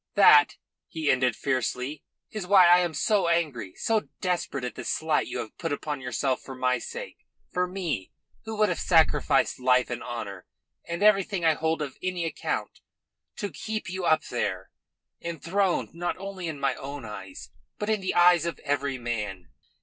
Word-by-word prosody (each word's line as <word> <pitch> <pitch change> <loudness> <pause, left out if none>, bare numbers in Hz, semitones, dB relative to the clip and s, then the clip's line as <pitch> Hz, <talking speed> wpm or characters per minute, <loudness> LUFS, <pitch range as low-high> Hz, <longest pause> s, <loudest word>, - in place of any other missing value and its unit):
That," 150 -8 +7 0.3
he 160 -3 0
ended 125 -3 +2
fiercely, 130 +2 -2 0.3
"is 210 -4 -5
why 190 -2 +7
I 175 +1 +7
am 175 -3 -1
so 200 +5 +2
angry, 145 - -1
so 220 -2 0
desperate 175 -7 -2
at 125 - -3
the - - -7
slight 155 -1 0
you - - -4
have 110 - -6
put 165 -3 -2
upon 145 -1 -3
yourself 130 +1 -1
for 135 - -9
my 125 0 +1
sake 485 +1 -7 0.4
for 180 0 +1
me, 175 - -3 0.3
who 220 -1 -5
would 215 -1 +3
have 175 - -1
sacrificed 160 -7 +3
life 125 0 +3
and 120 - -3
honour 100 -6 -6 0.4
and 170 +3 -2
everything 195 -3 +3
I 160 - +6
hold 160 0 -1
of 140 - -8
any 180 -2 -2
account, 165 - -3 0.6
to 205 -3 -4
keep 215 +5 -4
you 185 0 -4
up 155 -2 +3
there, 95 -6 -3 0.5
enthroned 170 +3 -1
not 175 +1 -3
only 190 -2 -6
in 155 -3 -5
my 135 -1 +1
own 140 -2 -7
eyes, 95 -3 -9 0.3
but 210 - -3
in 215 -2 +1
the 185 - -2
eyes 175 -1 +5
of 170 - -3
every 140 -2 -1
man." 105 -8 -4
160 Hz, 175 wpm, -27 LUFS, 130-180 Hz, 0.6 s, That